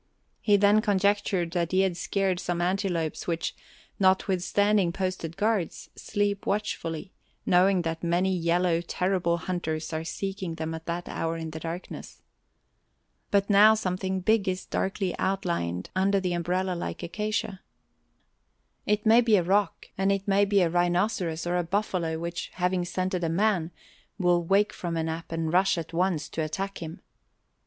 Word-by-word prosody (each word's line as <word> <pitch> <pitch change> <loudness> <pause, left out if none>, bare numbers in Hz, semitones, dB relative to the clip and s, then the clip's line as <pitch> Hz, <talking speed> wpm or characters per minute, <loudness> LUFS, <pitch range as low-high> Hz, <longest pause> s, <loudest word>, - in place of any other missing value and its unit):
He 205 -2 +4
then 205 +2 +5
conjectured 200 -4 +1
that 170 -1 -1
he 185 0 +3
had 190 -2 +1
scared 190 0 0
some 175 -1 -2
antelopes 175 -3 -1
which, 170 -1 -2 0.4
notwithstanding 190 0 +2
posted 185 -3 -3
guards, 210 -5 -1
sleep 205 -1 -2
watchfully, 190 -4 -2 0.3
knowing 180 0 +4
that 165 0 -3
many 180 +2 +1
yellow, 170 0 +1
terrible 180 -1 0
hunters 160 -2 -3
are 160 0 -2
seeking 190 +1 -4
them 160 0 -4
at 160 0 -8
that 170 +1 -3
hour 165 0 -2
in 160 -1 -5
the 160 - -6
darkness. 165 +3 -7 1.1
But 200 -1 +2
now 210 +2 +7
something 190 -2 -2
big 210 0 +2
is 185 0 -3
darkly 190 -1 -2
outlined 170 - -1
under 195 +1 +3
the 180 -2 -1
umbrella 180 +2 -1
like 175 - -5
acacia. 210 +1 -2 1.3
It 210 +1 +1
may 225 +2 +7
be 230 -3 +4
a 185 - +3
rock 195 +1 0
and 195 +1 +3
it 195 0 -1
may 200 +1 +4
be 200 -1 +3
a 175 - +3
rhinoceros 175 -1 0
or 175 +1 0
a 175 - +1
buffalo 175 -3 -1
which, 170 +1 -4
having 180 0 0
scented 185 0 -2
a 165 - +1
man, 180 -1 +1 0.5
will 175 -3 +2
wake 195 +4 +2
from 170 -2 -4
a 160 - 0
nap 160 +1 -5
and 165 0 -2
rush 185 0 +3
at 165 0 -5
once 170 -3 0
to 160 - -3
attack 190 +6 -3
him. 165 +3 -7
180 Hz, 160 wpm, -27 LUFS, 170-195 Hz, 1.3 s, now